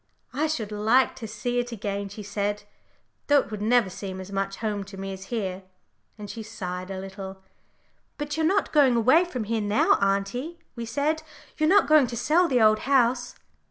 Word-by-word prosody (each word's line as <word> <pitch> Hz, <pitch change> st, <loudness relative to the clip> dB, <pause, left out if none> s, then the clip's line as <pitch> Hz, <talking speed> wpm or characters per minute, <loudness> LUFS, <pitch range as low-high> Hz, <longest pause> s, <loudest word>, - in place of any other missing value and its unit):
"I 300 Hz, +4 st, 0 dB
should 230 Hz, -9 st, -3 dB
like 220 Hz, +5 st, +3 dB
to 230 Hz, -4 st, -6 dB
see 240 Hz, +3 st, -2 dB
it 240 Hz, 0 st, -3 dB
again," 200 Hz, -2 st, -4 dB
she 205 Hz, +2 st, -8 dB
said; 205 Hz, +1 st, -2 dB, 0.6 s
"though 290 Hz, -, +5 dB
it -, -, -12 dB
would 210 Hz, -1 st, -5 dB
never 235 Hz, 0 st, +3 dB
seem 190 Hz, 0 st, -6 dB
as 190 Hz, +1 st, -8 dB
much 195 Hz, 0 st, -2 dB
home 210 Hz, -2 st, -3 dB
to 195 Hz, 0 st, -11 dB
me 195 Hz, 0 st, -5 dB
as 190 Hz, 0 st, -9 dB
here," 195 Hz, -4 st, -3 dB, 0.6 s
and 210 Hz, -1 st, -8 dB
she 225 Hz, +3 st, -7 dB
sighed 185 Hz, -4 st, -6 dB
a 190 Hz, -1 st, -4 dB
little. 190 Hz, 0 st, -8 dB, 0.7 s
"But 295 Hz, -1 st, -3 dB
you're 320 Hz, -, 0 dB
not 400 Hz, +4 st, +1 dB
going 275 Hz, -5 st, +5 dB
away 260 Hz, +10 st, +5 dB
from 255 Hz, -10 st, -4 dB
here 225 Hz, +1 st, -1 dB
now, 205 Hz, +1 st, +3 dB
auntie," 200 Hz, +12 st, -1 dB, 0.2 s
we 235 Hz, -1 st, -5 dB
said, 285 Hz, +7 st, 0 dB, 0.4 s
"You're 310 Hz, 0 st, +3 dB
not 405 Hz, +3 st, +5 dB
going 305 Hz, -4 st, +6 dB
to 235 Hz, -, -5 dB
sell 335 Hz, +9 st, +3 dB
the 255 Hz, -5 st, +2 dB
Old 215 Hz, 0 st, +5 dB
House?" 250 Hz, -2 st, +2 dB
220 Hz, 195 wpm, -26 LUFS, 200-260 Hz, 0.7 s, going